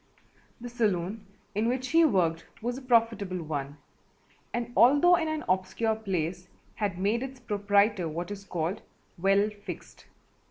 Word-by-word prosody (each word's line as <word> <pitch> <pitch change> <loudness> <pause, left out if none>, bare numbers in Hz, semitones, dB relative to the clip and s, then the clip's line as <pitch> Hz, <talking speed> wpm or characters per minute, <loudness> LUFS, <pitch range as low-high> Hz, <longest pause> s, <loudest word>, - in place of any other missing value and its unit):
The 245 - -7
saloon 210 -3 -1 0.3
in 215 +2 0
which 255 +1 -1
he 330 +3 +5
worked 170 - +2
was 240 +2 -2
a 265 - -7
profitable 225 -7 +1
one 145 -2 -4 0.7
and 240 0 -3
although 290 +8 +6
in 325 -2 0
an 310 0 -2
obscure 190 +4 +1
place 180 -4 -3 0.3
had 200 -4 -2
made 205 +5 +1
its 265 -1 -6
proprietor 205 -4 +2
what 170 +4 -5
is 200 -1 -6
called 175 +1 -3 0.4
"well 195 +3 +3
fixed." - - -9
205 Hz, 145 wpm, -28 LUFS, 180-240 Hz, 0.7 s, although